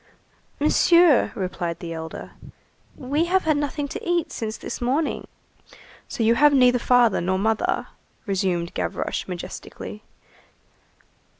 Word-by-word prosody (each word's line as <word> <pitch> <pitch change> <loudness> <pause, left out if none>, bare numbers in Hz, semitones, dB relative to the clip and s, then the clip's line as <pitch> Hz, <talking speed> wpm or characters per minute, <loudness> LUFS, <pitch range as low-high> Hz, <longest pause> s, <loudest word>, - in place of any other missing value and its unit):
"Monsieur," 330 0 +4
replied 180 -4 -3
the 170 -2 -6
elder, 160 0 -7 0.7
"we 285 +6 0
have 375 +2 +2
had 310 -1 +2
nothing 290 0 -2
to - - -6
eat 345 -2 0
since 220 -1 -4
this - - -7
morning." 275 +6 -1 0.8
"So 230 - -3
you 225 +1 +4
have 295 +3 +5
neither 250 -2 +5
father 240 -5 +3
nor 185 +2 0
mother?" 220 +2 0 0.4
resumed 185 -4 -1
Gavroche - - -3
majestically. 185 +3 -7
240 Hz, 120 wpm, -23 LUFS, 190-295 Hz, 0.8 s, have